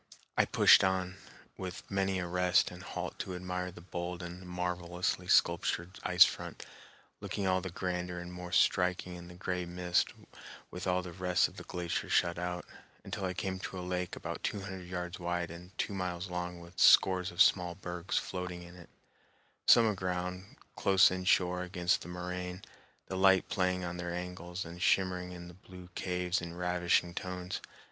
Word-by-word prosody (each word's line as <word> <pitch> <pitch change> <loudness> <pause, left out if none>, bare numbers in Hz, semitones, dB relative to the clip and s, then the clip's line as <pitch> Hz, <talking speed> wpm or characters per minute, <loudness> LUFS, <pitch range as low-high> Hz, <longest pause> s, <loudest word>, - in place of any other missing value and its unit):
I - - +4
pushed - - +7
on, 95 0 0 0.4
with 90 -1 -6
many 95 -1 0
a 90 - -2
rest 90 +1 +3
and - - -10
halt - - -5
to 95 - -4
admire 90 0 -3
the 85 - -12
bold 90 0 -5
and 85 +1 -7
marvelously 90 0 -2
sculptured 85 +3 +2
ice 90 -1 +7
front, - - -5 0.5
looking 100 - -3
all 95 0 +2
the 95 - -4
grander 90 0 -3
and 90 0 -7
more 90 0 -7
striking 90 0 +2
in 85 0 -9
the 90 - -11
gray 90 0 -2
mist 90 0 +1 0.6
with 90 +1 -5
all 90 0 +1
the 90 - -7
rest 90 0 +2
of - - -15
the - - -7
glacier 85 -1 -3
shut 85 0 +2
out, 90 0 -3 0.4
until 100 - -4
I 90 -1 -2
came 95 0 -2
to 95 - -6
a - - -4
lake 90 -1 -2
about - - -5
two 100 - -2
hundred 95 -2 -7
yards 90 0 -4
wide 85 -1 -2
and 85 +2 -10
two - - -1
miles 90 -1 -3
long 90 0 -3
with 85 +1 -11
scores 90 -1 +6
of 85 - -11
small 90 -2 +5
bergs 90 -1 -3
floating 90 -1 -3
in 85 +1 -12
it, 85 - -14 0.8
some 115 - +8
aground, 90 -2 -3 0.2
close 95 -1 +5
inshore 90 -1 +2
against 90 -1 +1
the - - -8
moraine, 90 +1 -5 0.4
the 95 - -5
light 95 0 +4
playing 90 -1 +1
on 90 0 -4
their 85 0 -4
angles 90 0 -5
and 85 +1 -9
shimmering 90 -1 +2
in 90 -1 -8
their 85 - -11
blue 90 -1 -11
caves 90 0 -1
in 85 0 -6
ravishing 90 -1 +1
tones. 90 0 -4
90 Hz, 180 wpm, -32 LUFS, -, 0.8 s, some